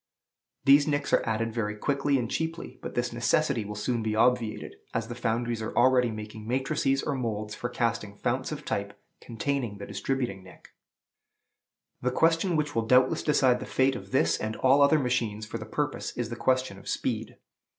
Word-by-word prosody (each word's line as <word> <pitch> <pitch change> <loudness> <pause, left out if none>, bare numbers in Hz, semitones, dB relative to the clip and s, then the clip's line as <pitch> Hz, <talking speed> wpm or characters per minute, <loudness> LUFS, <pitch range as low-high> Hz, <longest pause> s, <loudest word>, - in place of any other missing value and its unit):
These 145 +1 +6
nicks 145 -1 -1
are - - +5
added 115 0 -1
very 105 -2 -2
quickly 140 +4 +1
and 120 -3 -1
cheaply; 160 +6 -4
but - - -7
this 120 0 -1
necessity 125 +1 +1
will 105 +1 -6
soon 115 +3 -1
be 110 -1 -1
obviated, 115 -1 +1 0.2
as 115 0 -1
the - - -3
foundries 120 -1 -1
are 110 - -5
already 125 0 +5
making 110 0 -7
matrices 135 +2 0
or 145 - -1
moulds 110 -5 -3
for 120 - -4
casting 115 -4 -1
founts - - -2
of - - -6
type - - -3 0.2
containing 120 -2 -3
the 100 - -7
distributing 100 -1 -3
nick. 95 - -16 1.3
The 125 - +1
question 165 +6 +2
which 150 -1 0
will 115 -1 -1
doubtless 130 +1 +4
decide 130 -4 +3
the - - -7
fate 130 0 +2
of - - -8
this 130 - +2
and 110 0 -3
all 135 +2 +4
other 140 +2 +6
machines 120 -6 -1
for 115 +2 -6
the 110 - -7
purpose 145 +5 -3
is 120 -2 -2
the 120 - -4
question 130 -5 0
of - - -9
speed. - - -2
120 Hz, 185 wpm, -28 LUFS, 110-135 Hz, 1.3 s, These